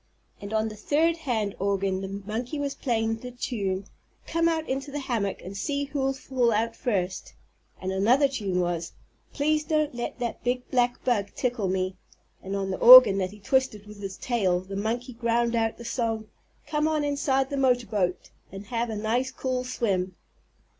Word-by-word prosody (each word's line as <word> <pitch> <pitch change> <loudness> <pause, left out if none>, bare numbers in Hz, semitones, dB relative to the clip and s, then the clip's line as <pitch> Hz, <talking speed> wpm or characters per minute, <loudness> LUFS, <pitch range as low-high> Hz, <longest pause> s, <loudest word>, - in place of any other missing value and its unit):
And 200 0 -7
on 220 0 +1
the 215 - -9
third 310 +10 +2
hand 230 -10 -2
organ 195 -1 0
the 195 - -4 0.2
monkey 235 +7 -3
was 285 -1 -2
playing 225 -3 -1
the 250 +2 -8
tune 200 -6 -3 0.4
"Come 335 0 +1
Out 320 -1 -1
Into 270 +2 -3
the 285 - -5
Hammock 230 -8 -2
and 190 +2 -8
See 285 +7 -1
Who'll 275 -1 -1
Fall 260 -3 0
Out 225 +1 0
First," 190 -7 -2 0.4
and 185 - -3
another 235 +9 +4
tune 200 -9 -1
was 175 -1 -2 0.4
"Please 305 +1 +1
Don't 305 -2 0
Let 240 0 -4
that 240 -2 -4
Big 250 +1 -1
Black 245 -1 +1
Bug 210 -6 +2
Tickle 240 -5 -1
Me," 185 0 -1 0.4
and 195 +1 -4
on 195 -1 -2
the 185 - -3
organ 245 -5 +10
that 185 -1 -1
he 210 +2 -13
twisted 240 -2 0
with 210 -1 -12
his 195 -1 -6
tail 190 -8 +1
the 195 +1 -8
monkey 235 +5 -2
ground 235 0 +1
out 225 -1 0
the 235 - -10
song 230 -2 -1 0.4
"Come 300 0 0
On 310 -1 +1
Inside 275 -2 0
the 280 - -1
Motorboat 225 -9 0 0.2
and 195 +2 -8
Have 235 +1 -2
a 220 - -3
Nice, 230 +5 0
Cool 255 -1 -2
Swim." 190 -7 -1
235 Hz, 180 wpm, -26 LUFS, 200-265 Hz, 0.4 s, organ